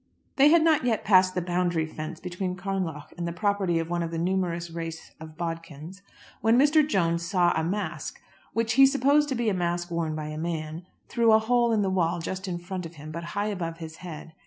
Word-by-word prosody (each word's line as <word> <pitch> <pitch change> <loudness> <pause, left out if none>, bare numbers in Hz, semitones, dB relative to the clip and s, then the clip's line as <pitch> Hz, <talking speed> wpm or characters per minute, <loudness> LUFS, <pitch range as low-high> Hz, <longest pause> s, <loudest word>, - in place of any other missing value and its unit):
They 275 +1 +7
had 330 0 +5
not 315 -4 +3
yet 235 -4 0
passed 185 -2 +4
the 180 - 0
boundary 175 -2 0
fence 155 +1 -7
between 180 0 -4
Carnlough 185 -5 -4
and 170 - -2
the - - -2
property 195 -1 0
of 165 0 -1
one 175 0 0
of 165 - -2
the 165 - -4
numerous 170 -1 -1
race 165 -1 -6
of 155 0 -11
Bodkins, 165 +1 -6 0.4
when 225 +3 +4
Mr. 295 +4 +5
Jones 170 - +1
saw 175 0 +2
a 160 - 0
mask, 200 +5 -3 0.3
which 230 0 0
he 270 +1 +8
supposed 280 +2 +3
to 265 - -1
be 235 -1 -1
a 210 - +2
mask 175 -1 -2
worn 165 -2 -1
by 155 -1 -4
a 155 0 -5
man, 165 +1 -4 0.2
through 235 -2 +3
a - - +8
hole 235 +1 +2
in 215 -2 +2
the 190 - 0
wall 175 -2 +1
just 185 +3 -5
in 175 -2 -2
front 180 0 -5
of 165 - -16
him, 150 +1 -9
but 170 +2 -5
high 205 +1 0
above 170 -5 -4
his 160 -1 -8
head. 165 -2 -9
175 Hz, 225 wpm, -26 LUFS, 165-205 Hz, 0.4 s, he